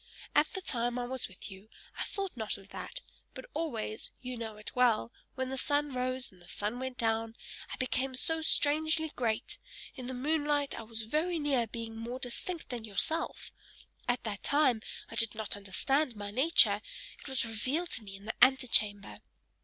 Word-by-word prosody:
At - - +5
the 380 -3 -4
time 240 -3 0
I 245 - -1
was 260 0 -1
with 190 +2 -8
you, 195 +3 -12 0.3
I - - -4
thought 390 - -3
not 220 -3 -1
of 200 0 -15
that, - - -6 0.3
but - - -7
always 230 -9 -2
you 250 0 -4
know 225 -2 -5
it 210 - -6
well 240 -2 +4 0.2
when 260 0 -1
the 265 - -2
sun 290 0 +1
rose, 255 0 0
and 185 - -19
when 175 - -17
the - - -6
sun 210 +4 -2
went 260 -1 -3
down, 225 0 +1 0.4
I - - -2
became 255 +1 0
so 320 +5 +1
strangely 315 +1 +2
great; 225 -3 -1 0.3
in 255 -2 -6
the 260 - -3
moonlight 290 +1 +2
I - - -4
was 225 0 -5
very 315 +9 +1
near 275 -6 +2
being 225 0 -5
more 235 +3 -4
distinct 260 +8 -3
than 245 -4 -4
yourself; 225 +10 +1 0.6
at 245 0 +1
that 205 -3 -3
time 285 -6 +4 0.3
I - - -6
did 225 -1 +1
not 220 -2 -1
understand 245 +7 +1
my 205 -1 -4
nature; 270 +10 +5 0.4
it - - -10
was 265 -3 +1
revealed 260 +10 -1
to 230 - -3
me 195 -2 -8
in 195 +1 -12
the 220 - -2
antechamber! 225 -6 +4
250 Hz, 190 wpm, -32 LUFS, 220-285 Hz, 0.6 s, At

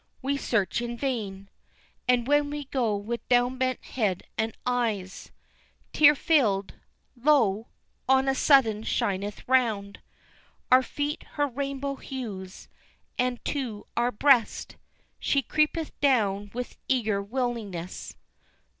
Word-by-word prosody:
We 280 +2 0
search 230 -6 0
in 240 0 -4
vain, 210 -8 -3 0.6
And 250 -1 +3
when 290 0 +3
we 295 0 -4
go 250 -6 0
with 220 +4 -5
down 245 +1 +3
bent 255 -1 -1
head 205 -7 -1
and 220 0 -2
eyes 225 -7 -2 0.6
Tear 295 0 +7
filled, 225 - +2 0.4
lo! 235 -6 +3 0.4
on 265 0 +4
a 270 - +3
sudden 265 -7 +4
shineth 200 -2 -2
round 220 -6 +1 0.7
Our 255 +1 +8
feet 290 +3 -3
her 290 - +1
rainbow 275 +1 -3
hues, 205 -10 -7 0.5
and 250 -1 -1
to 245 -8 -3
our 240 +1 +2
breast 250 0 +2 0.4
She 275 -1 +1
creepeth 305 +4 0
down 205 -7 +2
with 250 +1 -6
eager 220 -6 +1
willingness." 210 -6 -4
245 Hz, 120 wpm, -27 LUFS, 210-270 Hz, 0.7 s, Our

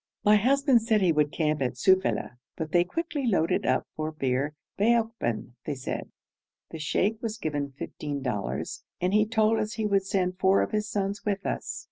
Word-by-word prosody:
My 210 +1 +7
husband 265 +2 +4
said 220 -2 +2
he 180 - +4
would 150 -2 +2
camp 155 -2 0
at 125 -2 0
Sufeila, 190 -7 +2 0.2
but 160 -1 -4
they 175 0 +5
quickly 290 - -3
loaded 175 -7 +1
up - - +2
for 155 0 -3
Bir 140 0 -1 0.2
Baokban, 225 - 0
they 145 - -2
said. 130 - -5 0.6
The 160 - -6
sheikh 205 +8 0
was 225 -2 -3
given 145 -7 -3
fifteen 145 -2 -5
dollars, 105 -7 -3 0.2
and 180 +2 0
he 215 0 +4
told 220 0 +2
us 215 0 -2
he 220 -1 -2
would 195 -2 +1
send 185 -1 0
four 190 +1 +4
of - - -4
his 210 0 -1
sons 200 0 -2
with 200 -1 -2
us. - - -3
190 Hz, 185 wpm, -27 LUFS, 150-215 Hz, 0.6 s, My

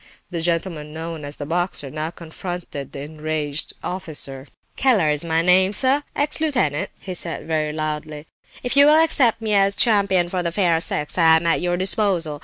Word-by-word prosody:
The 170 -2 -2
gentleman 165 -3 -2
known 160 -1 -6
as 145 +1 -7
the 145 - -6
"boxer" 170 -3 -2
now 155 +1 -3
confronted 170 -4 -7
the 140 - -7
enraged 155 0 -3
officer. 150 -7 -5 0.3
"Keller 210 - +3
is 150 +1 0
my 165 0 0
name, 185 +2 +4
sir; 265 +5 +4
ex 295 +2 +1
lieutenant," 250 - 0
he 185 - -7
said, 170 -2 -5
very 155 -1 -1
loud. 155 0 -3 0.6
"If 245 +1 -2
you 280 +1 +7
will 305 +1 +6
accept 245 -8 +3
me 215 -1 0
as 200 0 +3
champion 200 -5 +3
of 180 +1 -3
the 170 - -2
fair 170 -3 +1
sex, 150 +1 0
I 160 -1 +6
am 160 +1 0
at 165 - +2
your 175 0 0
disposal. 185 -5 0
170 Hz, 185 wpm, -21 LUFS, 155-195 Hz, 0.6 s, you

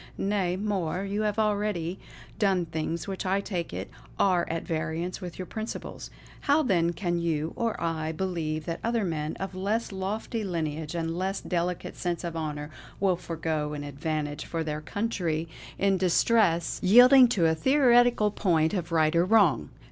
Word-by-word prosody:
Nay 195 -3 0
more, 190 -3 -1
you 200 +2 -2
have 210 0 0
already 205 -5 0 0.4
done 190 -4 +2
things 160 +2 -3
which 195 -1 -4
I 195 +1 +1
take 180 -4 -4
it - - -5 0.3
are 180 -3 +2
at 165 0 -3
variance 165 +3 -3
with 180 -2 -7
your 185 - -5
principles. 220 +4 -6 0.3
How 295 +2 +3
then 170 - +2
can 175 0 -1
you, 160 -2 -1
or 230 -2 -1
I, 160 -1 -2
believe 160 -3 -3
that 165 - -3
other 230 -2 0
men, 155 -3 -2
of 195 0 -5
less 205 +5 -1
lofty 210 +4 -3
lineage 160 -3 -3
and 165 -1 -2
less 195 +1 -1
delicate 175 0 -2
sense 175 -1 -3
of 170 -1 -4
honour, 150 -2 -4 0.3
will 190 -2 +3
forego 160 -3 -3
an 145 -1 -5
advantage 145 +1 -3
for 165 -1 -3
their 150 -1 -3
country 170 -3 -2 0.3
in 195 -1 +2
distress, 180 -1 +2
yielding 250 +6 +8
to 200 -8 +1
a 160 - +4
theoretical 245 - +4
point 165 -5 +1
of 175 -3 -3
right 160 0 +3
or 170 - +5
wrong. 185 - +3
175 Hz, 165 wpm, -27 LUFS, 160-205 Hz, 0.4 s, yielding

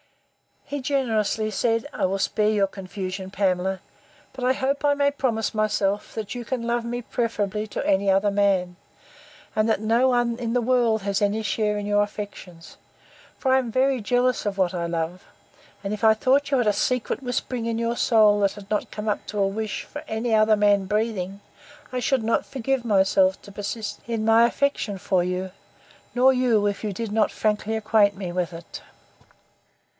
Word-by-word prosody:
He 285 - -4
generously 220 -5 0
said, 230 +3 0
I - - 0
will 190 +1 0
spare 210 +2 +1
your 210 -2 +3
confusion, 190 -1 -6
Pamela. 190 -1 0 0.5
But 260 -1 -4
I 255 - +4
hope 275 +2 -1
I 290 - +4
may 285 0 +2
promise 245 -6 -1
myself, 210 -2 0
that 215 -2 -4
you 245 -1 -6
can 250 -1 -3
love 235 0 -1
me 240 +1 -3
preferably 215 -3 -2
to - - -4
any 195 0 +2
other 195 +2 +3
man; 195 -3 +1 0.8
and 215 +1 +2
that 220 - +1
no 230 +4 +3
one 240 -2 +1
in 230 -2 -2
the 245 - +2
world 235 -3 +2
has 200 0 -1
had 205 - +3
any 215 +2 -3
share 210 0 0
in 205 - -4
your 205 0 +2
affections; 205 -5 -7 0.6
for 260 -1 +1
I 265 - +5
am 250 -3 -3
very 260 +2 +2
jealous 245 +3 +1
of 200 -1 -2
what 185 -1 +1
I 170 -1 -2
love; 170 +2 -3 0.6
and 200 +1 -2
if 215 +1 -2
I 220 - +7
thought 265 +6 +2
you 275 - +2
had 245 -3 +1
a 210 - +4
secret 250 +5 -1
whispering 245 -2 -3
in 230 -1 -1
your 235 +1 -1
soul, 215 -3 +4
that 200 -1 +2
had 205 -1 -13
not 210 - +1
yet - - -24
come 210 0 -4
up 210 - -2
to 210 - -4
a 195 - +3
wish, 215 +2 -3
for 295 - -9
any 225 +1 -1
other 215 0 +5
man 205 -1 +3
breathing, 205 -2 -2 0.5
I 255 - -2
should 255 -1 +1
not 225 +1 +1
forgive 265 -1 -2
myself 190 -2 +3
to 200 - -12
persist 205 +2 -5
in 230 -2 -2
my 225 +1 +6
affection 240 -6 -1
for 185 -1 +1
you; 180 +1 -2 0.6
nor 255 +2 +6
you, 240 -5 +2
if 205 -1 -1
you 210 -2 -2
did 225 +2 -4
not 215 -1 +2
frankly 215 +1 -1
acquaint 215 -2 +3
me 190 -3 -5
with 180 0 -2
it. 165 0 -9
215 Hz, 195 wpm, -24 LUFS, 200-240 Hz, 0.8 s, I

